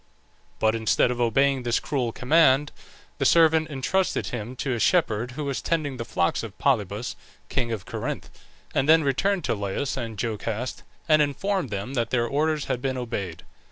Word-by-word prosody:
But 110 0 +2
instead 115 +2 +2
of 125 0 -2
obeying 135 +3 +2
this 120 -1 +1
cruel 130 -6 -1
command, 145 +2 +3 0.5
the - - +1
servant 160 -1 +4
intrusted 155 +7 0
him 120 +1 -5
to 130 0 -2
a 120 - -2
shepherd 120 - +2
who 150 - -4
was 135 -6 -2
tending 150 -4 -1
the 115 - -4
flocks 85 -6 0
of 110 -3 -8
Polybus, 110 -4 0 0.3
king 120 -2 -1
of 105 -4 -4
Corinth, - - -5 0.4
and 135 +3 +1
then 160 0 +7
returned 180 +8 +1
to - - 0
Laius 100 +6 -2
and 115 -2 -4
Jocaste, 115 +2 -3 0.3
and 155 -2 +5
informed 150 +3 0
them 100 +5 -4
that 120 -4 0
their 120 -2 +1
orders 150 +4 0
had 125 - -2
been 130 -1 -1
obeyed. 100 -9 -4
125 Hz, 175 wpm, -25 LUFS, 115-150 Hz, 0.5 s, then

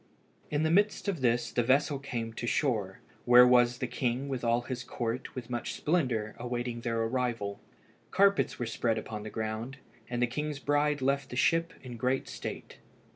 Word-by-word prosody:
In 150 +1 0
the 160 - +2
midst 205 +4 +2
of 185 -8 -1
this 120 -1 +1
the 120 - +1
vessel 140 +4 +2
came 115 -4 -4
to 120 - -4
shore, 110 -9 0 0.2
where 125 0 +9
was 120 -1 +5
the 130 - -2
king 125 +2 -2
with 130 -3 -3
all 120 +1 +2
his 125 0 -5
court 120 0 -4
with 125 -2 -6
much 120 -1 -3
splendour 125 -10 0
awaiting 120 0 -3
their 115 -1 -1
arrival. 115 -4 -2 0.5
Carpets 200 +1 +3
were 120 - -2
spread 115 0 0
upon 110 -1 -5
the 110 - -6
ground, 110 +4 -4 0.3
and 120 -1 -2
the 125 - +4
king's 150 +4 -3
bride 145 0 +1
left 140 0 +1
the - - -6
ship 165 +6 +2
in 125 -2 -8
great 130 +3 0
state. - - -7
125 Hz, 180 wpm, -30 LUFS, 115-140 Hz, 0.5 s, where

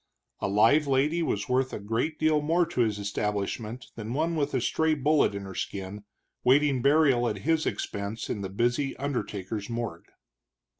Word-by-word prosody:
A - - -1
live 115 +10 +4
lady 145 +5 +2
was 155 - -1
worth 130 0 +1
a - - -3
great 115 +10 -2
deal 155 -1 +2
more 165 +4 +2
to 165 -7 -1
his 110 -3 +1
establishment 105 +3 -3
than 110 +1 -5
one 165 +3 0
with 145 -3 -1
a - - +2
stray 160 +6 +1
bullet 145 -5 +2
in 100 - -5
her 95 -1 -8
skin, 100 +2 -5 0.4
waiting 135 0 +4
burial 140 -4 +4
at 105 - -3
his 160 0 +2
expense 100 +3 -3
in 105 - -3
the 95 - -4
busy 120 +7 0
undertaker's 110 -7 -4
morgue. 115 -8 -5
125 Hz, 170 wpm, -27 LUFS, 105-150 Hz, 0.4 s, live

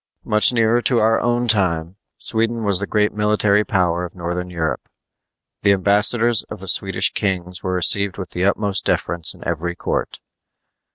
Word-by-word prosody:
Much 105 +3 +2
nearer 115 0 +1
to 120 0 0
our 115 +1 +2
own 120 0 -1
time, 90 -5 0 0.2
Sweden 115 +1 +1
was 100 -3 +2
the 100 - -4
great 105 -1 0
military 105 -1 +1
power 90 -6 -1
of 90 - -8
northern 90 +1 -5
Europe. 85 -3 -4 0.7
The 100 0 +3
ambassadors 105 +4 +3
of - - -8
the 95 - -7
Swedish 95 +1 +2
kings 90 -3 -3
were 95 - -3
received 95 +2 +2
with 95 -2 -7
the 90 - -3
utmost 100 -1 0
deference 85 -2 +1
in - - -10
every 85 +1 -3
court. - - -4
100 Hz, 165 wpm, -19 LUFS, 90-110 Hz, 0.7 s, The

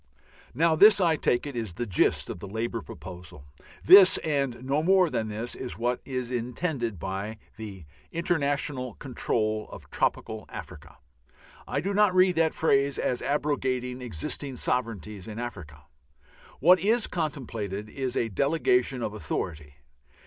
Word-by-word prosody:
Now 160 +3 +3
this 205 +5 +8
I 170 -4 +3
take 120 -4 +1
it 145 -3 -6
is 110 -7 -4
the 120 - -2
gist 95 -6 +2
of - - -7
the 100 - -8
Labour 115 +3 -3
proposal. 90 -3 -10 0.4
This 190 -1 +9
and 140 -5 -1
no 140 +3 +1
more 185 0 +4
than 110 - -1
this 110 +3 -4
is 125 - -6
what 120 +2 -1
is 125 -2 -4
intended 125 - -2
by 95 +5 -4 0.2
the 100 -6 -9 0.3
"international 145 -7 -1
control 110 -5 -2
of - - -12
tropical 110 -2 -1
Africa." 75 +1 -10 0.7
I 140 - -1
do 195 +5 -2
not 205 -2 +3
read 185 -1 +5
that 160 -1 +2
phrase 140 -3 +2
as 125 - -1
abrogating 130 -4 -1
existing 125 - -4
sovereignties 105 -6 -3
in 110 -1 -7
Africa. 85 - -7 0.7
What 180 +5 +6
is 225 +3 +2
contemplated 115 - -4
is 130 +2 -4
a 115 - +1
delegation 125 - +1
of 105 - -3
authority. 80 -8 -5
125 Hz, 145 wpm, -27 LUFS, 105-150 Hz, 0.7 s, This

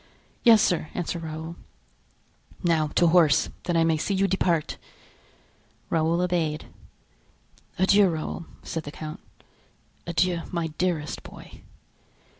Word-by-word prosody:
"Yes, 225 -3 +7
sir," 165 -3 0
answered 170 -1 -3
Raoul. 160 +1 -6 1.1
"Now 165 -3 +2
to 175 - +4
horse, 160 -4 +4 0.2
that 175 -2 +1
I 165 - +4
may 165 -1 +2
see 195 +6 -1
you 195 +1 +2
depart!" 175 -4 0 1.1
Raoul 165 +1 +2
obeyed. 170 -4 -1 1.1
"Adieu, 195 +1 +5
Raoul," 160 0 -4 0.2
said 165 - -4
the 145 - -8
count; 155 0 -7 0.9
"adieu, 170 +1 +1
my 170 -2 -2
dearest 170 -5 -1
boy!" - - -13
170 Hz, 115 wpm, -26 LUFS, 160-180 Hz, 1.1 s, Yes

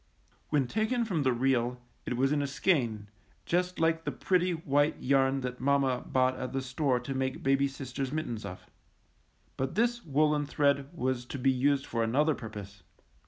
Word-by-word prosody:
When 145 -3 +2
taken 220 - 0
from 180 -8 -1
the 130 -2 +2
reel 125 0 +1 0.3
it 125 - -1
was 135 +2 +2
in 150 -1 +2
a 140 - -1
skein, 130 - 0 0.4
just 180 +1 0
like 165 0 +2
the - - -2
pretty 180 -1 +1
white 145 -2 +1
yarn 135 0 +2
that 125 -1 -4
mamma 135 -2 +2
bought 130 0 +2
at 130 0 -4
the 135 - -1
store 130 0 0
to 125 +3 -5
make 130 0 -2
baby 135 +1 +3
sister's 135 -1 -5
mit 155 +1 -2
tens 115 -2 -5
of. 90 -2 -8 0.9
But 135 +4 -2
this 235 +2 +1
woolen 150 0 +2
thread 140 -1 +1
was 130 -6 -2
to 140 - -6
be 135 +1 +3
used 135 +2 +1
for 115 - -2
another 145 +8 +2
purpose. 105 -5 -8
135 Hz, 180 wpm, -30 LUFS, 125-150 Hz, 0.9 s, baby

